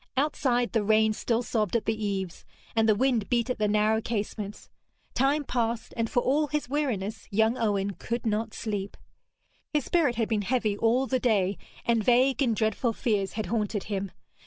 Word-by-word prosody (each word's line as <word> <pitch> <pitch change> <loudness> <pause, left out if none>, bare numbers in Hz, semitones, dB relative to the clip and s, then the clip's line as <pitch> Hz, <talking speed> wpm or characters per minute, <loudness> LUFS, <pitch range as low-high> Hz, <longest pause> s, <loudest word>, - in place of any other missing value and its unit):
Outside, 260 -4 +1
the 225 -3 +1
rain 220 +1 +3
still 230 +2 0
sobbed 220 -3 -1
at 225 - +1
the 220 -1 -1
eaves, 190 -4 -3 0.3
and 225 0 +3
the 215 - +5
wind 240 -2 +1
beat 240 0 +1
at 250 - -4
the 210 - +2
narrow 215 +1 +2
casements. 210 -2 -4 0.5
Time 280 +3 +2
passed, 235 -3 -2
and 230 -1 -1
for 245 - +2
all 295 +3 +2
his 300 -2 -2
weariness 225 -8 -2
young 220 +3 +2
Owen 205 -4 0
could 235 +5 -4
not 220 +1 0
sleep. 205 -3 -4 0.7
His 300 -4 0
spirit 310 -8 +2
had 225 -1 0
been 215 -2 0
heavy 220 -1 0
all 235 +5 +2
the 260 -1 0
day, 205 -6 +2 0.3
and 230 -2 +2
vague 255 +4 +3
and 235 -5 +2
dreadful 220 +2 0
fears 205 -6 -1
had 215 -1 -3
haunted 210 -3 -1
him. 200 -1 -3
225 Hz, 180 wpm, -27 LUFS, 210-245 Hz, 0.7 s, the